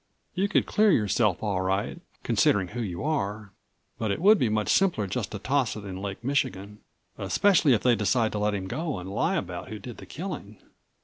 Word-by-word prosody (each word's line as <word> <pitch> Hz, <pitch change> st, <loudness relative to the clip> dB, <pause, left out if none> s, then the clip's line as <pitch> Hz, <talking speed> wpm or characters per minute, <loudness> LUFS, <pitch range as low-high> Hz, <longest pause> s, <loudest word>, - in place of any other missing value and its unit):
You 190 Hz, +2 st, +1 dB
could 205 Hz, -, +2 dB
clear 215 Hz, 0 st, +3 dB
yourself 105 Hz, -, +2 dB
all 100 Hz, -3 st, 0 dB
right, 95 Hz, +2 st, -1 dB, 0.2 s
considering 95 Hz, -3 st, +2 dB
who 120 Hz, +3 st, -5 dB
you 90 Hz, -3 st, -4 dB
are. 105 Hz, -9 st, -2 dB, 0.5 s
But 110 Hz, -, -1 dB
it 100 Hz, -, -1 dB
would 205 Hz, +5 st, +6 dB
be 120 Hz, -, +2 dB
much 105 Hz, -1 st, 0 dB
simpler 180 Hz, -, +2 dB
just 100 Hz, +3 st, -3 dB
to 105 Hz, -, -4 dB
toss 130 Hz, +3 st, 0 dB
it 105 Hz, -1 st, -8 dB
into 95 Hz, -1 st, -6 dB
Lake 100 Hz, +2 st, -5 dB
Michigan, 105 Hz, -6 st, -2 dB, 0.4 s
especially 180 Hz, -9 st, +3 dB
if 110 Hz, -, +1 dB
they 125 Hz, -2 st, +4 dB
decide 110 Hz, +2 st, +1 dB
to 105 Hz, -, -3 dB
let 105 Hz, 0 st, +1 dB
him 95 Hz, -2 st, -4 dB
go 155 Hz, -, -3 dB
and 90 Hz, 0 st, -7 dB
lie 165 Hz, -, +1 dB
about 90 Hz, -, -4 dB
who 110 Hz, -, -6 dB
did 120 Hz, +3 st, -9 dB
the -, -, -11 dB
killing." 145 Hz, -, -6 dB
110 Hz, 205 wpm, -27 LUFS, 100-140 Hz, 0.5 s, would